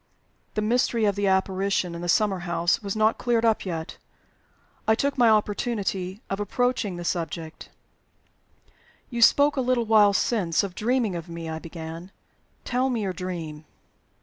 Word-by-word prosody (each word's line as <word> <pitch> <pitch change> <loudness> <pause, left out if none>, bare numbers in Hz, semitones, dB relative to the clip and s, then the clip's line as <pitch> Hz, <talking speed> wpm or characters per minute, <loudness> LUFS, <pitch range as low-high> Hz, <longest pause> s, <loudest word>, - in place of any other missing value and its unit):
The 215 - 0
mystery 235 0 +1
of 200 -2 +2
the 200 -1 0
apparition 190 -1 +1
in 170 - -6
the 175 - -4
summer 195 0 +2
house 170 +1 0
was 200 -1 -4
not 215 +1 +2
cleared 235 -2 +1
up 220 -3 +1
yet. 160 -2 -5 0.9
I 220 - +5
took 280 +4 0
my 240 -3 +5
opportunity 205 -2 -1
of 195 - -3
approaching 220 -1 0
the 175 - -6
subject. 165 -2 -4 1.4
"You 235 -1 -3
spoke 285 +5 +5
a - - +2
little 250 -2 +1
while 210 -2 +5
since 195 -5 +1
of 195 -3 -4
dreaming 225 -2 0
of 170 -1 -6
me," 170 -1 -6
I 160 0 -4
began. 165 +2 -8 0.5
"Tell 255 +2 0
me 235 -4 -1
your 190 -2 -2
dream." 165 -4 -6
200 Hz, 160 wpm, -25 LUFS, 175-230 Hz, 1.4 s, I